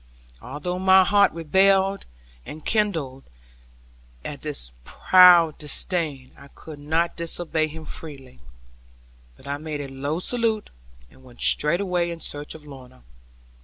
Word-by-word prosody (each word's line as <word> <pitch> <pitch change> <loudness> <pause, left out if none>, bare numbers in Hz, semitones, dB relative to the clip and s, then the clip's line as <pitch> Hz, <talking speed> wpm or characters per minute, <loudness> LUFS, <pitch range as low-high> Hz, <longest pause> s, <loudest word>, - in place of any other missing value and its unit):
Although 180 +5 -5
my 190 0 +6
heart 200 +1 +3
rebelled 190 +4 +2 0.4
and 155 - -10
kindled 165 - -1 1.0
at - - -7
his - - -5
proud 175 - +5
disdain, 150 -3 -3
I 140 - -15
could 150 +1 -13
not 160 +3 -1
disobey 165 -1 -2
him 160 +1 -10
freely; 140 - -9 1.0
but 145 +1 -6
made 155 -2 -5
a 145 - -5
low 140 +3 -4
salute, 225 +2 -2 0.4
and 130 - -21
went 125 -2 -16
straightway 175 +2 +2
in 170 -1 -6
search 145 -1 -6
of 155 -2 -13
Lorna. 130 - -14
160 Hz, 125 wpm, -23 LUFS, 145-180 Hz, 1.0 s, my